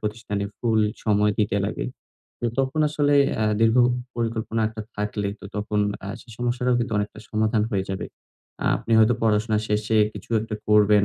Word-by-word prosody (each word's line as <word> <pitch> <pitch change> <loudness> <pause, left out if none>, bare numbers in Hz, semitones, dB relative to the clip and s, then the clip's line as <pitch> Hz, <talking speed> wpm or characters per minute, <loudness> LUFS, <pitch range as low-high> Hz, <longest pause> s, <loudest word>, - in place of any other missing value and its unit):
প্রতিষ্ঠানে 105 -2 -3
ফুল 110 -2 +2 0.2
সময় 105 -1 +3
দিতে 105 -2 +1
লাগে। - - -3 0.5
তো 120 - 0
তখন 135 +3 +1
আসলে 145 -1 +2 0.2
অ্যা 110 - +1
দীর্ঘ 115 +1 +4 0.4
পরিকল্পনা 115 -1 -1
একটা 110 -1 -7
থাকলে 105 -1 -2
তো - - -12
তখন 105 0 -1 0.2
আ - - -5
সেই 120 -1 -14
সমস্যাটাও 125 0 +1
কিন্তু 120 -2 -2
অনেকটা 105 +1 -3
সমাধান 110 0 +1
হয়ে 95 -2 0
যাবে। 95 - -3 0.7
আপনি 115 - -4
হয়তো 110 +2 +5
পড়াশোনা 110 0 +2
শেষে 105 +1 +1 0.2
কিছু - - -11
একটা 110 0 -5
করবেন 105 -1 +5
110 Hz, 165 wpm, -24 LUFS, 105-115 Hz, 0.7 s, হয়তো